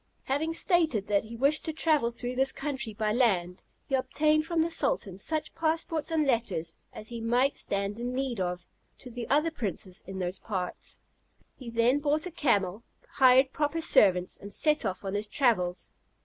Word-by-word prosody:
Having 315 +5 -1
stated 320 - +1
that 205 0 +1
he 230 +2 -9
wished 280 +6 +2
to 320 - -1
travel 305 -6 +2
through 245 +1 -5
his 265 +1 +3
country 265 -5 -4
by 215 0 -1
land, 185 -8 +1 0.2
he 275 - -9
obtained 305 +4 +1
from 330 -1 +1
the 335 - -2
sultan 200 - 0
such 310 +8 -3
passports 320 -1 -1
and 320 -2 +1
letters 195 - -1 0.2
as 215 - -8
he 235 -1 -6
might 245 +4 +2
stand 200 +2 -2
in 245 +1 -3
need 255 -3 -2
of, 180 -1 -3 0.3
to 250 - -11
the 235 0 -6
other 300 +4 +2
princes 195 - -4
in 190 0 -7
those 185 0 -2
parts. 185 -4 -5 0.6
He 250 -3 -9
then 235 +4 +2
bought 295 +2 0
a 360 - -5
camel, 205 - 0 0.3
hired 260 0 +5
proper 300 +2 -1
servants, 185 - +4
and 200 - -10
set 300 -1 +2
off 190 0 -3
on 195 - -3
his 205 +1 0
travels. 210 -8 0
245 Hz, 180 wpm, -28 LUFS, 200-300 Hz, 0.6 s, hired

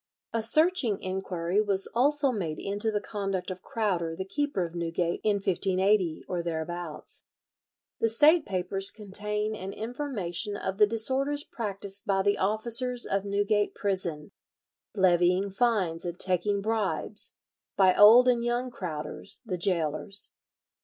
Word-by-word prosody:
A 230 - 0
searching 285 - +4
inquiry 185 0 -2
was 200 -2 -1
also 280 +3 +3
made 170 -9 -3
into 205 +3 -3
the 210 -1 -1
conduct 195 -3 -4
of 185 - -8
Crowder, 185 -9 -2
the 190 - -5
keeper 275 -3 -2
of 165 - -9
Newgate 170 0 -2
in 210 -1 +2
1580, 190 -2 +1
or 180 -2 -2
thereabouts. 170 -1 -5 0.8
The 225 - +2
State 305 +8 +5
Papers 195 +1 0
contain 210 +1 -3
an 195 -1 -6
information 215 - -4
of 190 0 -4
the 210 - +6
disorders 265 +6 +1
practised 200 -4 -6
by 195 -1 +1
the 200 +1 +1
officers 235 +5 +3
of 195 0 -1
Newgate 205 +1 0
prison, 180 -6 -2 0.6
levying 185 0 +2
fines 195 -7 0
and 175 0 -4
taking 195 +3 +1
bribes, 220 -2 -2 0.4
by 190 -2 +5
old 230 +5 +8
and 240 -2 +2
young 240 +1 -1
Crowders, 155 -8 -6
the 185 -5 -4
gaolers. 175 +2 -1
200 Hz, 135 wpm, -27 LUFS, 180-225 Hz, 0.8 s, old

